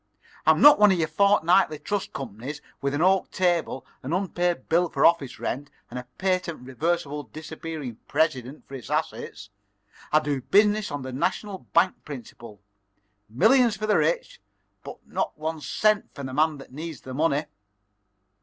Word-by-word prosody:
I'm - - +5
not 295 -4 +9
one 210 -1 +7
of 185 - +2
your 160 -2 +1
fortnightly 180 -1 +3
trust 200 +6 -3
companies 135 +3 -6 0.2
with 140 0 -1
an 155 - +1
oak 190 0 +3
table, 175 -7 0 0.2
an 135 +5 -4
unpaid 175 -5 -1
bill 170 +1 +2
for - - +1
office 165 -6 +2
rent, 140 +3 -4 0.2
and 125 - -4
a 125 - -10
patent 185 -5 -1
reversible 150 +2 -2
disappearing 155 -5 -7
president 140 -3 -1
for - - -14
its 130 -5 -8
assets. 105 0 -3 0.6
I 155 - +5
do 145 -3 -2
business 210 - +3
on 145 -2 -5
the 130 0 -6
national 190 +8 -3
bank 185 - +2
principle: 115 -6 -10 0.7
millions 220 - +4
for 215 - -3
the 215 - +3
rich, - - -1 0.4
but - - -8
not - - -3
one 160 0 -4
cent 215 +6 +1
for 140 - -7
the 130 -1 -6
man 155 +2 +2
that 135 -2 -13
needs 160 +1 -7
the 130 - -8
money." 150 +1 +1
155 Hz, 165 wpm, -25 LUFS, 135-185 Hz, 0.7 s, not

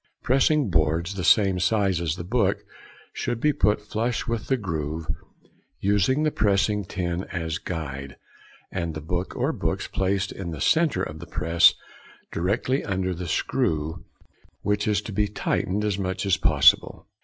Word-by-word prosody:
Pressing 135 -2 +3
boards, 80 +3 +1
the 95 -2 -4
same 95 0 +4
size 95 -2 +1
as 80 -2 -1
the 85 - -6
book, 100 0 +1 0.5
should 120 -1 -2
be 150 +4 +2
put 105 -4 +2
flush 115 +3 -2
with 115 -2 -3
the 135 - +2
groove, 80 - -3 0.7
using 105 +9 +2
the 155 - +2
pressing 105 -1 +1
tin 90 0 -3
as 80 -2 -3
guide, 70 -5 -6 0.5
and 85 -3 -3
the - - -3
book 90 +4 -3
or - - 0
books - - -2
placed 95 0 -1
in 95 -3 -6
the 80 -3 -6
centre 160 - +2
of 75 0 -6
the 85 - -9
press 85 0 +4 0.6
directly 110 - 0
under 95 -1 -1
the 90 0 -6
screw, 80 +1 -1 0.6
which 105 +1 0
is 105 -1 +1
to 110 - -6
be 105 +1 +1
tightened 105 0 -1
as 100 -1 -1
much 95 +1 -2
as 95 -2 +3
possible. - - +4
95 Hz, 160 wpm, -25 LUFS, 85-105 Hz, 0.7 s, same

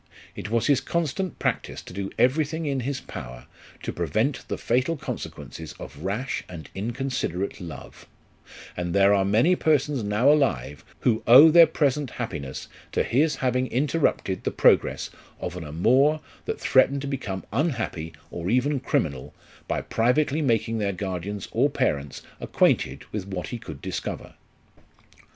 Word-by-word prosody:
It - - -6
was 115 0 +1
his 140 -2 +3
constant 170 +3 -2
practice - - -2
to - - -11
do 100 +1 -4
everything 155 +5 +1
in 140 -2 0
his 130 +2 -2
power 60 -1 -9 0.4
to - - -3
prevent - - -1
the - - -3
fatal 130 +7 0
consequences 80 - -7
of 70 +2 -11
rash 110 +8 -2
and 80 -5 -9
inconsiderate 115 -4 -3
love; 80 -7 -10 0.7
and 85 0 -3
there 100 0 +5
are 100 -1 +3
many 110 - +3
persons 145 -5 +1
now 105 +7 +3
alive, 75 - +1 0.2
who 115 -3 +2
owe 135 +7 +10
their 170 0 +8
present 145 -2 0
happiness 65 -9 -5 0.3
to - - +2
his 150 +4 +2
having 125 +1 +1
inter 145 +6 0
rupted 95 - 0
the - - 0
progress - - +3 0.3
of - - -5
an 90 - -6
amour 125 - +3 0.3
that - - -3
threatened 135 +1 +3
to 140 - -4
become 105 -9 -4
unhappy, 115 - -1 0.2
or 85 +1 -4
even 130 +5 +2
criminal, 75 - -2 0.3
by - - -1
privately 135 +6 +1
making 115 -4 +1
their 100 -2 0
guardians 95 +1 -4
or 130 +6 +3
parents 75 - -1 0.2
acquainted 65 +2 +1
with 100 -3 -4
what 95 -2 -4
he 120 - -5
could 80 -9 -9
discover. - - -5
115 Hz, 150 wpm, -25 LUFS, 95-140 Hz, 0.7 s, owe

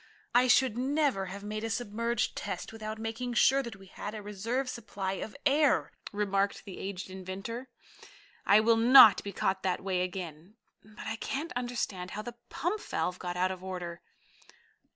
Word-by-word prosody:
"I 250 +1 +5
should 245 -2 +4
never 270 -7 +1
have 200 +2 -7
made 215 +1 -4
a 225 - -2
submerged 230 +1 -1
test - - -5
without 215 0 -5
making 230 +2 -4
sure 270 +3 +5
that 235 -5 -7
we 195 0 -14
had 205 +3 -7
a 210 - -6
reserve 225 +6 -2
supply 205 -6 -4
of 200 +5 -5
air," 295 +1 +3 0.2
remarked 200 -1 0
the 195 - -8
aged 190 -1 -5
inventor. 195 +7 -6 0.7
"I 205 +2 +6
will 225 +1 +4
not 230 -3 +9
be 200 - -5
caught 190 -1 0
that 185 -1 -1
way 185 -2 0
again. 180 0 -5 0.3
But 215 0 -12
I 225 - -3
can't 295 +8 -3
understand 235 -7 -3
how 215 - -3
the 240 0 -8
pump 355 +9 -2
valve 180 0 -2
got 180 -1 -4
out 185 +1 +2
of 185 -1 -7
order." 175 -2 -5
215 Hz, 175 wpm, -30 LUFS, 190-240 Hz, 0.7 s, not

